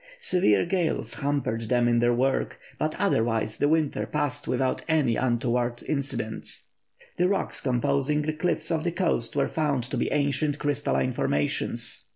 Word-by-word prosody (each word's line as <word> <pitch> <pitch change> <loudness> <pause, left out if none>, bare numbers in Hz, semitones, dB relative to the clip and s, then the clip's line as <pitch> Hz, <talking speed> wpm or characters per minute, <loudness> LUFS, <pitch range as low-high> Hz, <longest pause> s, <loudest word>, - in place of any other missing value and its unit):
Severe 175 - +3
gales 170 - 0
hampered 140 -6 -1
them 120 -1 +3
in 120 0 +3
their 120 +1 +3
work, 130 +3 0 0.2
but - - -1
otherwise 115 -1 +1
the 145 - +2
winter 150 -9 +1
passed 145 +5 -2
without 130 +1 0
any 150 -8 +2
untoward 120 -1 0
incidents. 140 -6 -3 0.5
The 180 - +3
rocks 200 - -1
composing 140 +3 +1
the 155 +1 -1
cliffs 175 +3 -1
of 160 -1 0
the 175 - 0
coast 170 -10 0
were - - +2
found 145 -5 0
to - - -1
be - - 0
ancient 145 +1 +1
crystalline 145 -3 0
formations. 75 - -1
140 Hz, 155 wpm, -26 LUFS, 120-150 Hz, 0.5 s, Severe